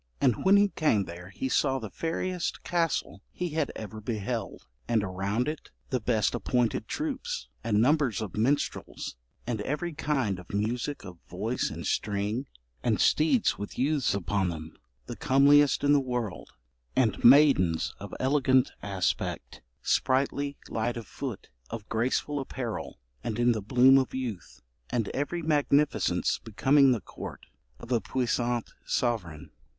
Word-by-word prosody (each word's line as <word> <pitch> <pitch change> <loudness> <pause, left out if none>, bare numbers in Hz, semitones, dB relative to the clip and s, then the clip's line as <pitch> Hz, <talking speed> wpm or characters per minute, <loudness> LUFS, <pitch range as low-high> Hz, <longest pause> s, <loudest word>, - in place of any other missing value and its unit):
'And 120 -5 +2
when 195 +1 +7
he 200 0 +4
came 135 - +2
there 90 0 -9
he 115 +7 -4
saw 135 0 +2
the 110 -6 -6
fairest 175 +2 -3
castle 165 - -1
he 180 - -3
had 155 -2 -1
ever 110 0 -7
beheld, 110 0 -4 0.2
and 115 -3 +2
around 100 +6 -1
it 155 0 -5 0.2
the 130 - +1
best 110 -2 +1
appointed 120 -3 0
troops, 315 - -3
and 105 -2 +2
numbers 130 -3 +3
of 110 -4 -5
minstrels 130 - -1 0.3
and 115 -3 -2
every 150 +8 -2
kind 135 - -1
of 90 - -12
music 120 +5 -2
of 90 -3 -10
voice 110 +8 -1
and - - -7
string, 105 +5 -1 0.3
and - - +1
steeds 160 +10 +3
with 105 - -6
youths 140 -4 +1
upon 100 0 0
them, 80 -1 -7 0.3
the - - -6
comeliest 140 +2 +4
in 145 0 +5
the 145 - +5
world, 125 -7 -3 0.5
and 115 -6 +1
maidens 120 - +5
of - - -8
elegant 130 -1 +3
aspect, 100 -3 -2 0.2
sprightly, 140 +2 +1
light 115 +2 -2
of 115 - -6
foot, 130 -7 -6 0.2
of 110 -2 -7
graceful 130 +5 0
apparel, 130 -4 -5 0.3
and 110 - -3
in 120 0 +4
the 110 -2 -1
bloom 130 +5 +6
of 130 - -2
youth; 120 -8 -5 0.3
and 115 -4 -1
every 160 +5 -2
magnificence 150 -1 +2
becoming 135 +5 +4
the 120 -4 0
court - - -9 0.3
of 120 - -10
a 120 -3 +2
puissant 120 -2 -1
sovereign. 90 - -2
125 Hz, 145 wpm, -28 LUFS, 105-145 Hz, 0.5 s, when